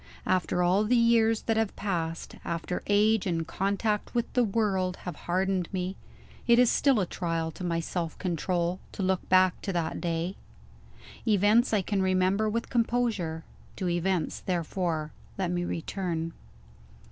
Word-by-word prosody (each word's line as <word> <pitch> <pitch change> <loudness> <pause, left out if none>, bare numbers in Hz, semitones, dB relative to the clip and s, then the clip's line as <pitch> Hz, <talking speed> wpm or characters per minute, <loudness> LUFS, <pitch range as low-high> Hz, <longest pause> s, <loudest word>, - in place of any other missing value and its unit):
After 180 -1 +1
all 185 +4 +3
the 245 +4 +3
years 230 -1 +4
that 225 -1 0
have 225 -2 0
passed 165 -5 -3
after 170 +1 -3
age 210 0 +3
and 165 -2 -1
contact 200 +6 -1
with 235 - -1
the 250 - +4
world 195 -4 0
have 180 -4 -4
hardened 185 0 0
me 185 0 -2 0.5
it 235 - +6
is 245 -1 +5
still 275 -5 +3
a 190 - +1
trial 165 -2 -2
to 180 - -9
my 170 -1 0
self 165 0 -3
control 175 0 -1
to 195 - -3
look 185 -1 0
back 185 0 +4
to 195 - -3
that 165 -2 -2
day. 170 +2 -2 0.9
Events 215 +4 +4
I 210 -3 +2
can 200 +1 0
remember 190 +3 +2
with 230 +2 -3
composure. 225 -9 0 0.3
To 185 - -2
events, 175 0 0
therefore, 170 -3 -2 0.3
let 185 -2 -1
me 175 0 -1
return. 165 -1 -3
185 Hz, 155 wpm, -28 LUFS, 175-210 Hz, 0.9 s, it